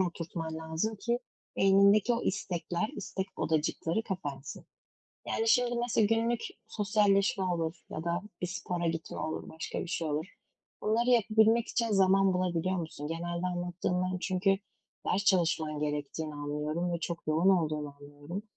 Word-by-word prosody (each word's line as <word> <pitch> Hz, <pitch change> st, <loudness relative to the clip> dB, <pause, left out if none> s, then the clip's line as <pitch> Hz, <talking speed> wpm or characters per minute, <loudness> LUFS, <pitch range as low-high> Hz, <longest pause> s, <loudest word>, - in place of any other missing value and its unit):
oturtman 165 Hz, -2 st, -3 dB
lazım 160 Hz, +7 st, -2 dB
ki 235 Hz, +3 st, 0 dB, 0.4 s
beynindeki 200 Hz, +4 st, +5 dB
o 235 Hz, -, -2 dB
istekler, 180 Hz, 0 st, -1 dB
istek 195 Hz, -1 st, -3 dB
odacıkları 160 Hz, +5 st, 0 dB
kapansın. 145 Hz, -9 st, -5 dB, 0.6 s
Yani, 450 Hz, 0 st, 0 dB
şimdi, 245 Hz, -, +4 dB
mesela 235 Hz, -3 st, +2 dB
günlük 230 Hz, +1 st, +1 dB, 0.3 s
sosyalleşme 200 Hz, -2 st, +2 dB
olur 165 Hz, -2 st, -1 dB, 0.2 s
ya 160 Hz, -, -5 dB
da 170 Hz, +2 st, 0 dB, 0.2 s
bir 180 Hz, -, 0 dB
spora 175 Hz, -1 st, -3 dB
gitme 165 Hz, 0 st, -3 dB
olur, 160 Hz, -, -3 dB
başka 160 Hz, -, -5 dB
bir -, -, -4 dB
şey 165 Hz, -2 st, -1 dB
olur, 150 Hz, +4 st, -1 dB, 0.6 s
bunları 235 Hz, +4 st, +2 dB
yapabilmek 225 Hz, 0 st, +4 dB
için 230 Hz, -1 st, 0 dB
zaman 195 Hz, -1 st, +4 dB
bulabiliyor 180 Hz, 0 st, 0 dB
musun? 160 Hz, -3 st, -5 dB
Genelde 170 Hz, +2 st, -2 dB
anlattığından 180 Hz, +1 st, -1 dB
çünkü 195 Hz, +1 st, +2 dB, 0.5 s
ders 200 Hz, +2 st, +1 dB
çalışman 160 Hz, -5 st, +2 dB
gerektiğini 150 Hz, +1 st, -3 dB
anlıyorum 150 Hz, +4 st, -2 dB
ve 170 Hz, -, -2 dB
çok 170 Hz, -1 st, -4 dB
yoğun 160 Hz, +5 st, +3 dB
olduğunu 155 Hz, -5 st, +1 dB
anlıyorum. 145 Hz, +7 st, -7 dB
180 Hz, 140 wpm, -31 LUFS, 160-200 Hz, 0.6 s, beynindeki